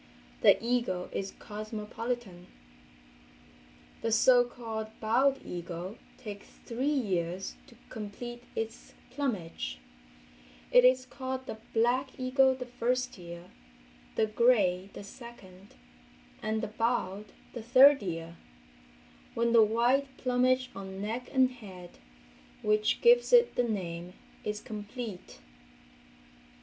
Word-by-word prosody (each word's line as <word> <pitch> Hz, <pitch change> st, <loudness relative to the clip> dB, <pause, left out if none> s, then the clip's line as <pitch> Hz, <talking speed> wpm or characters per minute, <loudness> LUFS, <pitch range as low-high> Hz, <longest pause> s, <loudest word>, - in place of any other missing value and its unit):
The -, -, +7 dB
eagle 235 Hz, -7 st, 0 dB
is 195 Hz, -, -3 dB
cosmopolitan. 215 Hz, -2 st, -5 dB, 1.5 s
The 225 Hz, -, -1 dB
so 245 Hz, +2 st, +6 dB
called 225 Hz, -3 st, -5 dB
bald 260 Hz, +5 st, +3 dB
eagle 175 Hz, +3 st, -6 dB, 0.2 s
takes 210 Hz, -5 st, -9 dB, 0.2 s
three 245 Hz, +4 st, -2 dB
years 190 Hz, -, -1 dB
to 245 Hz, -, -17 dB
complete 240 Hz, +2 st, -7 dB
its 225 Hz, +1 st, -5 dB, 0.2 s
plumage; 205 Hz, -, -3 dB, 0.9 s
it 250 Hz, -, +7 dB
is 255 Hz, 0 st, +5 dB
called 260 Hz, 0 st, -5 dB
the 220 Hz, -, -7 dB
"black" 250 Hz, +4 st, +1 dB
eagle 260 Hz, +1 st, +3 dB
the 255 Hz, -1 st, -6 dB
first 250 Hz, -1 st, -1 dB
year, 170 Hz, 0 st, -10 dB, 0.6 s
the 220 Hz, -, +3 dB
"gray" 210 Hz, -5 st, +3 dB
the -, -, -8 dB
second 200 Hz, -4 st, -13 dB, 0.7 s
and 220 Hz, +1 st, -1 dB
the -, -, -1 dB
"bald" 215 Hz, -2 st, -1 dB, 0.2 s
the 240 Hz, -, -5 dB
third 265 Hz, +4 st, +7 dB
year, 165 Hz, -2 st, -5 dB, 1.0 s
when 235 Hz, 0 st, +1 dB
the 230 Hz, -, +8 dB
white 240 Hz, +6 st, +3 dB
plumage 255 Hz, 0 st, +1 dB
on 190 Hz, -1 st, -7 dB
neck 225 Hz, +5 st, -4 dB
and 260 Hz, -1 st, +4 dB
head, 190 Hz, -8 st, -12 dB, 0.6 s
which 210 Hz, 0 st, +2 dB
gives 485 Hz, +1 st, +5 dB
it 480 Hz, -1 st, +6 dB
the 245 Hz, -, +1 dB
name, 175 Hz, -3 st, -4 dB, 0.3 s
is 210 Hz, 0 st, -3 dB
complete. 210 Hz, -, -7 dB
225 Hz, 115 wpm, -30 LUFS, 195-250 Hz, 1.5 s, the